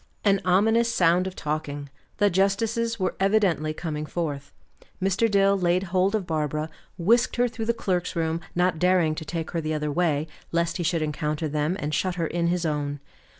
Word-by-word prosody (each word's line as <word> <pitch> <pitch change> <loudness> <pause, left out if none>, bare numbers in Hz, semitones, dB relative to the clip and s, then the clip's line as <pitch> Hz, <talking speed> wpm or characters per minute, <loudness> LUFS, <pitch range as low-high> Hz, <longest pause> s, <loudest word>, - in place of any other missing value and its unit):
An 200 -1 +4
ominous 225 +6 +3
sound 180 -1 +3
of 190 - -6
talking; 145 -2 -3 0.3
the 205 -1 +3
justices 225 +5 +1
were 185 -1 0
evidently 195 -6 +2
coming 155 -1 -4
forth. 145 -4 -4 0.5
Mr. 195 +4 +2
Dill 200 -1 +4
laid 180 -1 +1
hold 190 +3 +3
of 205 -4 -1
Barbara, 155 -1 -2 0.3
whisked 230 +8 +3
her 245 +1 +3
through 225 -1 -5
the 235 - +3
clerks' 180 -6 -1
room, 165 0 -1
not 180 -2 +1
daring 180 -3 +3
to 160 +1 -6
take 165 +1 -4
her 165 - -1
the 155 0 -2
other 150 -1 -2
way, 155 -2 +1 0.3
lest 170 0 0
he 175 - -2
should 165 -1 +1
encounter 150 +1 -2
them, 150 +4 -1
and 150 +1 -3
shut 185 +3 0
her 170 -2 -1
in 170 +1 -1
his 175 0 0
own. 145 -2 -2
175 Hz, 190 wpm, -25 LUFS, 155-195 Hz, 0.5 s, An